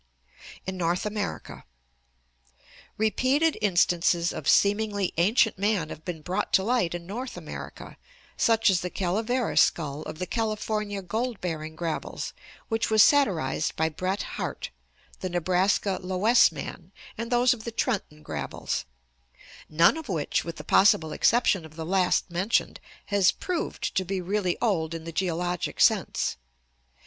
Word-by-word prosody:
In 190 0 -4
North 175 +3 0
America. 210 -1 -4 0.7
— 65 +1 -43 0.5
Repeated 260 +9 +2
instances 175 -3 +2
of 145 - -2
seemingly 205 -2 +2
ancient 210 +4 +3
man 200 -6 0
have 155 - -9
been 165 -4 -6
brought 185 +5 -2
to 190 - +5
light 220 -6 +1
in 170 -1 -7
North 240 +8 -6
America, - - -9 0.4
such 225 -2 +3
as 180 - +1
the 180 - -3
"Caleveras 220 +7 +1
skull" 150 -3 0
of 155 - -7
the 180 - -3
California 215 -2 -2
gold 225 +5 -2
bearing 160 -3 -4
gravels, 165 -1 -4 0.3
which 225 -1 -1
was 220 -1 +7
satirized 190 - +2
by 160 0 +1
Bret 185 +5 -2
Harte; - - -5 0.5
the 185 - -3
Nebraska 185 +2 +1
"Loess 190 +6 +4
man"; - - -8 0.2
and 230 +2 -5
those 245 +1 +4
of 225 -3 -9
the 235 - -4
Trenton 200 -10 -2
gravels: - - -4 0.8
none 165 - +4
of 320 -6 -8
which, 160 -6 0
with 170 -1 -6
the - - -8
possible 165 -5 +4
exception 230 -7 +3
of 155 -1 -13
the 160 -1 -5
last 180 +1 +2
mentioned, 185 +6 0 0.3
has 195 -3 +5
proved 355 -3 -3
to 190 - +2
be 190 +1 -3
really 185 0 -1
old 170 -8 0
in 165 - -6
the 165 - -6
geologic 175 0 -2
sense. - - +2
190 Hz, 145 wpm, -26 LUFS, 170-220 Hz, 0.8 s, was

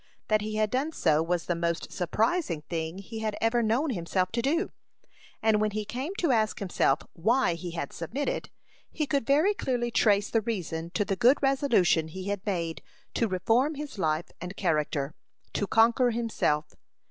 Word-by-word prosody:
That 215 -1 +3
he 215 0 -4
had 215 -1 +1
done 280 +5 0
so 155 - +3
was 170 0 -1
the 175 - 0
most 170 0 -2
surprising 195 - 0
thing 165 0 -3
he 220 +3 -7
had 215 -1 -2
ever 225 +1 +2
known 240 +7 +1
himself 185 -1 -1
to 235 - 0
do. 325 +9 0 0.7
And 220 -1 +3
when 215 - +2
he 210 0 -3
came 265 - -4
to 335 -8 +1
ask 220 -3 +2
himself 175 -6 +1
why 220 +3 +2
he 175 +1 -6
had 165 -5 -4
submitted, 240 - -3 0.4
he 305 - -2
could 275 -4 -1
very 310 +9 +4
clearly 245 -10 -1
trace 205 -2 +3
the 225 - +3
reason 170 -7 -3
to 205 - +2
the 195 - -1
good 245 +8 +5
resolution 240 - +3
he 185 +4 -6
had 200 -1 -2
made 170 -4 -2 0.3
to 230 - +1
reform 230 - +1
his 290 -7 -7
life 155 -1 0
and 180 +3 -6
character 150 -4 0 0.4
to 205 - -1
conquer 235 +3 +4
himself. 225 -10 0
215 Hz, 180 wpm, -28 LUFS, 170-245 Hz, 0.7 s, good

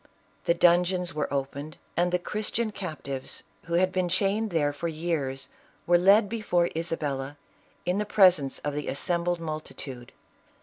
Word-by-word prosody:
The 170 - +3
dungeons 180 0 +3
were 150 0 -2
opened 140 +2 -3 0.2
and 175 +1 +2
the 180 - +3
Christian 215 +4 -2
cap 185 -6 -6
tives, 135 -1 -4 0.2
who 170 0 -1
had 185 +1 +3
been 185 -1 0
chained 200 +4 +1
there 150 -5 +1
for 155 +4 -3
years, 155 -5 -2 0.4
were 175 0 +5
led 200 +4 +6
before 195 -6 0
Isabella, 145 -4 -3 0.5
in 180 +3 +1
the 210 - 0
presence 180 -10 +5
of 145 - -3
the 150 0 -4
assembled 170 +5 0
multi 155 -1 -5
tude. 125 -3 -8
170 Hz, 160 wpm, -27 LUFS, 145-185 Hz, 0.5 s, led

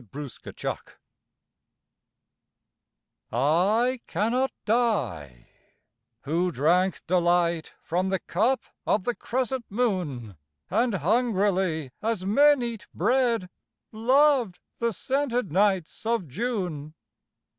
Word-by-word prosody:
The 140 -3 -8
Wine - - -1 2.6
I 205 - +2
cannot 235 +8 0
die, 120 - -1 0.8
who 170 +5 0
drank 175 +6 +1
delight 175 -2 +1
From 180 +3 -1
the 190 - +1
cup 225 +10 0 0.3
of 205 - +2
the 245 - 0
crescent 255 0 -2
moon, 175 - -2 0.3
And 230 +2 +2
hungrily 190 - +1
as 220 -4 -1
men 285 +6 +5
eat 225 -3 -5
bread, 235 -1 +1 0.4
Loved 250 -2 +3 0.2
the 235 0 +1
scented 250 - -1
nights 190 -2 +1
of 230 -7 0
June. 165 - -3
200 Hz, 90 wpm, -26 LUFS, 170-240 Hz, 2.6 s, men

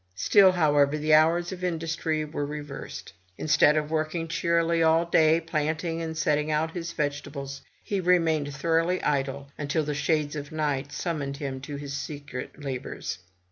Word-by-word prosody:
Still, 190 - +5
however, 145 -4 +3
the 155 +1 +1
hours 165 +3 +4
of 185 -1 -7
industry 160 -2 -1
were 150 -1 -4
reversed. 145 -1 -7 0.2
Instead 150 0 +4
of 150 0 -1
working 160 +1 -1
cheerily 170 0 +1
all 165 +1 +4
day, 160 -1 +4
planting 165 +1 -2
and 160 -1 -4
setting 150 -1 +1
out 155 +1 0
his 170 -1 -5
vegetables, 145 -2 -4 0.2
he 200 - -1
remained 165 -5 +2
thoughtfully 165 +5 +1
idle, 140 -1 -1
until 150 +2 0
the 150 0 -2
shades 150 0 0
of 145 +1 -6
night 145 -2 -1
summoned 150 -3 -3
him 135 -3 -5
to 145 +2 -6
his 140 0 -6
secret 145 0 -6
labors. 130 -8 -5
155 Hz, 155 wpm, -27 LUFS, 145-165 Hz, 0.2 s, Still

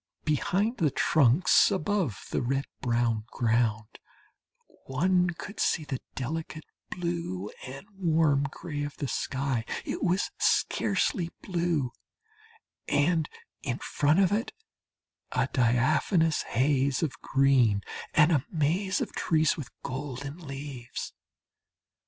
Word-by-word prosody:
Behind 190 - +1
the 155 - +3
trunks, 140 +3 +4
above 190 - -1
the - - 0
red 135 +3 0 0.2
brown 115 -3 +1
ground 115 -3 0 0.9
one 180 +7 +2
could 190 +4 -7
see 160 - +2
the 135 -3 -4 0.2
delicate 155 +3 -4 0.3
blue 170 - -3 0.2
and 135 +9 -8
warm 160 -6 +2
gray 150 -1 -6
of 145 0 -5
the 140 - -2
sky 130 -3 -1 0.2
it - - -3
was 185 +2 +1
scarcely 180 - +1
blue 170 -8 0 1.0
and 160 +1 +2 0.3
in 125 -3 -2
front 150 +5 +1
of 190 -1 +4
it 220 +4 -1 0.8
a - - +2
diaphanous 150 - +2
haze 135 +2 +2
of 135 -7 -3
green, 130 -7 +3 0.3
and 155 +1 +6
a 145 -6 +3
maze 175 +5 +1
of - - -2
trees 160 -1 +2
with 150 - -7
golden 140 +2 -5
leaves. 135 -5 -7
145 Hz, 115 wpm, -28 LUFS, 130-170 Hz, 1.0 s, and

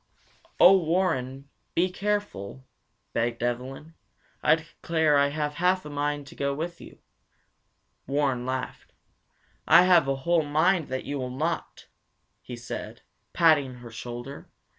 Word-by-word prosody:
"Oh, 190 +2 +8
Warren, 155 -6 -1 0.3
be 180 +2 +2
careful, 190 - -3 0.5
begged 115 0 -1
Evelyn. 130 +6 -4 0.5
I - - +5
declare 160 -1 0
I 140 0 +4
have 150 0 -2
half 185 0 +2
a 150 - -7
mind 145 0 -2
to 140 - -13
go 140 0 -1
with 170 +3 -5
you!" - - -13 1.1
Warren 135 -3 0
laughed. 130 0 -5 0.7
"I 180 - +8
have 175 -6 +5
a 135 - +1
whole 170 -1 +3
mind 160 +3 +2
that 130 0 -4
you 145 -1 -3
will 125 -1 -3
not!" 155 +7 -4 0.6
he 125 - -8
said, 120 +1 -7 0.3
patting 145 -6 +3
her 120 -1 -11
shoulder. 120 +4 -8
145 Hz, 135 wpm, -26 LUFS, 130-165 Hz, 1.1 s, Oh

